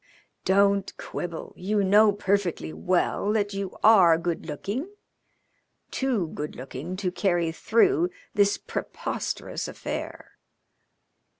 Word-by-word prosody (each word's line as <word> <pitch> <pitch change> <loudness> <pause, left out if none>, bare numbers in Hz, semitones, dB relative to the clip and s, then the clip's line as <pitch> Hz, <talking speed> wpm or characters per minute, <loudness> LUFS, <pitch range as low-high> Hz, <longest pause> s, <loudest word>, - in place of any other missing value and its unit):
"Don't 200 0 +2
quibble. 170 -2 -6
You 205 +2 0
know 205 +2 +6
perfectly 195 - -1
well 180 - 0
that 205 -2 0
you 195 -1 -4
are 190 -7 +7
good 170 0 -3
looking 205 - -4 1.0
too 240 -11 0
good 150 0 -5
looking 135 +7 -6
to 185 -1 -2
carry 175 -3 +1
through 345 - +2 0.2
this 205 -2 +3
preposterous - - -4
affair." - - -6
195 Hz, 105 wpm, -26 LUFS, 170-205 Hz, 1.0 s, are